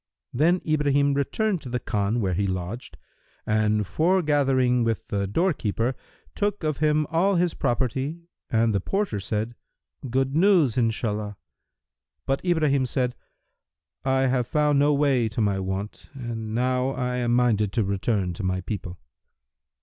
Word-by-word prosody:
Then 170 +8 +3
Ibrahim 145 -2 +2
returned 180 +7 0
to 130 - -8
the 125 0 -1
Khan 105 +2 -1
where 95 -3 0
he 100 +3 0
lodged, 95 +6 -5 0.5
and 105 -1 +1
foregathering 140 - +2
with 115 -1 -1
the 100 -1 -1
doorkeeper, 120 - 0 0.4
took 205 -3 -1
of 155 -3 -1
him 150 0 +2
all 190 +5 +2
his 175 -1 +1
property 130 +5 -1 0.3
and 115 -1 +2
the 100 - +2
porter 195 - -1
said, 110 +4 -2 0.6
"Good 135 +3 0
news, 170 - +4
Inshallah!"[FN#333] 110 -3 -1 0.9
But 135 0 -1
Ibrahim 150 -7 +2
said, 125 0 -1 0.9
"I 130 0 +2
have 130 -2 +1
found 150 -1 +2
no 145 +1 +4
way 140 -5 +2
to 110 - -5
my 100 -3 +1
want, 95 +2 -5
and 115 -4 -5
now 125 +1 +1
I 125 -2 -2
am 120 -1 +1
minded 110 -5 +2
to 115 - +1
return 100 -1 -1
to 90 - -7
my 95 0 -1
people." 90 -2 -5
125 Hz, 145 wpm, -25 LUFS, 105-145 Hz, 0.9 s, news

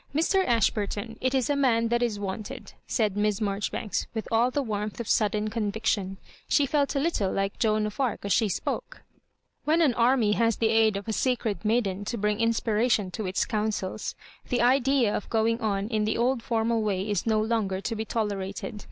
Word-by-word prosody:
Mr. 380 +5 +3
Ashburton, 225 - 0
it 260 +1 +1
is 260 -3 +2
a 290 - +1
man 230 -5 +2
that 235 +1 +1
is 225 -4 0
wanted," 205 +1 -6
said 215 -5 0
Miss 205 -1 +1
Marjoribanks, 205 0 -2
with 220 - -3
all 230 +2 +3
the 280 +2 -1
warmth 210 -2 -3
of 235 - -4
sud 215 -2 +3
den 215 0 -1
conviction. 205 -3 -1 0.3
She 285 - +4
felt 285 +1 0
a - - +2
little 275 - 0
like 195 0 -2
Joan 215 -1 +2
of 210 +3 -6
Arc 255 -6 -1
as 200 - +2
she 220 -3 +2
spoke. - - -4 0.6
When 315 +2 +2
an 300 -7 +4
army 235 -2 +3
has 230 +1 +2
the 225 - +1
aid 220 -2 +3
of 200 - -7
a 220 - -1
sacred 235 -4 -1
maiden 210 -3 0
to 235 - -3
brmg 210 0 0
inspiration 225 -3 +1
to 210 +1 -4
its 185 - 0
counsels, 210 -2 -2 0.3
the 245 -2 +1
idea 255 -3 +3
of - - -4
going 230 +1 +1
on 200 -2 -1
in 215 -2 0
the 215 - 0
old 245 +1 +1
formal 230 0 0
way 200 -2 -1
is 205 0 -1
no 220 -1 +3
longer 215 -4 0
to 225 - -3
be 220 - -2
tolerated. 205 -2 -3
220 Hz, 200 wpm, -27 LUFS, 205-235 Hz, 0.6 s, She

